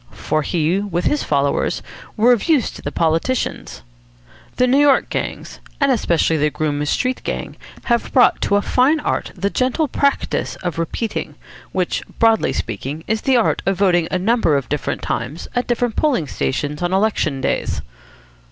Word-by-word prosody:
For 110 +9 -2
he, 165 +4 0
with 185 -4 -2
his 295 - +1
followers, 140 -1 0 0.3
were 235 +3 +5
of 235 - -1
use 290 -8 +3
to - - -11
the - - -4
politicians. 165 - -1 0.7
The 250 - +3
New 260 +3 +3
York 285 -2 +4
gangs, - - -4 0.2
and 280 -2 +3
especially 170 -8 +2
the 150 0 +2
Groome 150 -1 -2
Street 255 +10 0
Gang, - - -4 0.3
have 235 -1 0
brought 255 - +4
to 200 - +1
a 205 - +2
fine 275 +5 +3
art - - -2
the 200 +1 -1
gentle 260 +5 +1
practice 280 +1 0
of 175 -2 -3
"repeating"; 205 +7 -3 0.4
which, 180 -2 -1 0.2
broadly 225 -1 +3
speaking, 135 +8 -4
is 220 +1 -1
the 265 -2 +3
art 230 - +1
of 195 -1 +1
voting 175 -4 +3
a 185 - 0
number 190 -6 +2
of 135 -4 -4
different 150 0 -2
times 130 +8 -3
at 245 - 0
different 240 -1 0
polling 275 - +1
stations 145 +2 -2
on 175 +1 0
election 190 -8 +1
days. - - -1
195 Hz, 170 wpm, -19 LUFS, 155-245 Hz, 0.7 s, were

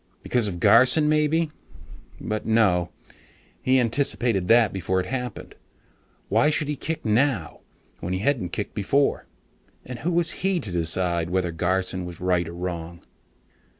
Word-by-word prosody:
Because 120 -4 +1
of 90 -3 -5
Garson 125 - +5
maybe? 155 +1 +1 0.7
But 110 0 -3
no, 95 -6 +2 0.2
hadn't - - -25 0.4
he 130 0 +3
anticipated 120 -5 0
that 115 0 +4
before 95 0 -1
it 90 - -2
happened? 125 -1 -5 0.7
Why 150 - +3
should 155 -1 0
he 150 - -1
kick 160 +1 -5
now, 110 - 0 0.4
when 90 - -4
he - - 0
hadn't 110 -3 0
kicked 100 +4 -4
before? 135 +7 0 0.6
And 125 -1 -7
who 165 +8 -1
was 170 -1 +2
he 190 -2 +2
to 105 - -6
decide 85 0 0
whether 90 -1 0
Garson 90 +2 -1
was 90 -1 -8
right 90 -2 0
or 85 - -7
wrong? 85 -1 -6
105 Hz, 150 wpm, -24 LUFS, 90-135 Hz, 0.7 s, Garson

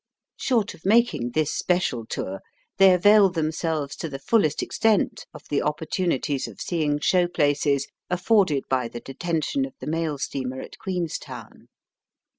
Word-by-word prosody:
Short 230 -6 0
of 170 - -17
making 205 - +2
this 155 -2 +1
special 150 -11 0
tour, 95 +1 -4 0.4
they 195 -1 +7
avail 205 +2 +6
themselves 160 -3 -2
to 165 - -4
the 135 - -5
fullest 155 +1 +1
extent 220 -3 +1
of - - -12
the 145 - +1
oppor 150 +1 -2
tunities 145 -6 -1
of - - -12
seeing 150 -4 -1
show 180 +4 +3
places 145 -4 +1 0.2
afforded 180 -5 +2
by 130 -2 0
the 120 - -7
detention 165 - -2
of 270 -1 -6
the - - -7
mail 160 -1 -1
steamer 130 -1 -4
at - - -10
Queenstown. 180 -6 -5
160 Hz, 150 wpm, -24 LUFS, 140-185 Hz, 0.4 s, they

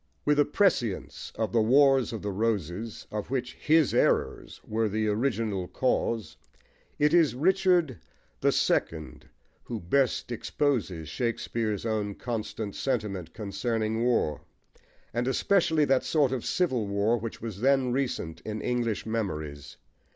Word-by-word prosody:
* - - -42
With 150 0 +3
a 145 - +5
prescience 145 - 0
of 110 0 -1
the 115 - +3
Wars 135 +2 +4
of 115 - -6
the 100 - -2
Roses, 105 0 -2
of 105 -1 -4
which 130 -1 -2
his 155 -2 +3
errors - - +1
were 110 0 0
the 110 +1 0
original 105 -4 -1
cause, 110 -9 -1 0.6
it 150 +2 +3
is 165 -7 +4
Richard 175 - +2 0.4
who 80 +7 -2
best 125 +7 0
exposes 115 - -1
Shakespeare's 115 -3 -2
own 105 -3 -1
constant 110 -3 -4
sentiment 100 - -3
concerning 110 +2 -2
war, 115 -11 +1 0.7
and 120 +2 -1
especially 160 +1 +2
that 135 -2 +2
sort 145 -5 +2
of 130 -3 -2
civil 130 - 0
war 100 +4 +1
which 115 +1 -6
was 110 -3 -6
then 135 -1 +3
recent 120 -11 -2
in 110 0 -4
English 120 -2 -1
memories. 80 -11 -4
115 Hz, 130 wpm, -28 LUFS, 105-135 Hz, 0.7 s, a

